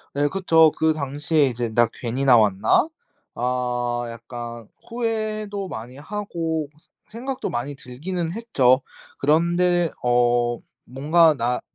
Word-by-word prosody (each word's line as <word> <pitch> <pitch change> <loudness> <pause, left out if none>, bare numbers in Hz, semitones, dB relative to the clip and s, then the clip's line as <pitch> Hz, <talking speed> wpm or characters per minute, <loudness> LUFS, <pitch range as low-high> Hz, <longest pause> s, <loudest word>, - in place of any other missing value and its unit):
네. 145 +1 +2
그쵸. 165 -3 +4
그 160 0 +3
당시에 145 +1 0
이제 120 -2 -2
'나 120 +1 +4
괜히 125 +3 -3
나왔나?' 110 - +4 0.5
아 120 -1 -1
약간 115 0 -8 0.2
후회도 215 -4 -3
많이 120 +1 -8
하고 165 -3 -3
스 155 - -26 0.2
생각도 255 +4 -4
많이 120 +4 -3
들기는 165 +7 -5
했죠. 140 - +2 0.4
그런데 170 +3 +2
어 120 -1 +2 0.3
뭔가 155 +6 +3
나 125 -1 -1
145 Hz, 220 characters per minute, -23 LUFS, 120-175 Hz, 0.5 s, 그쵸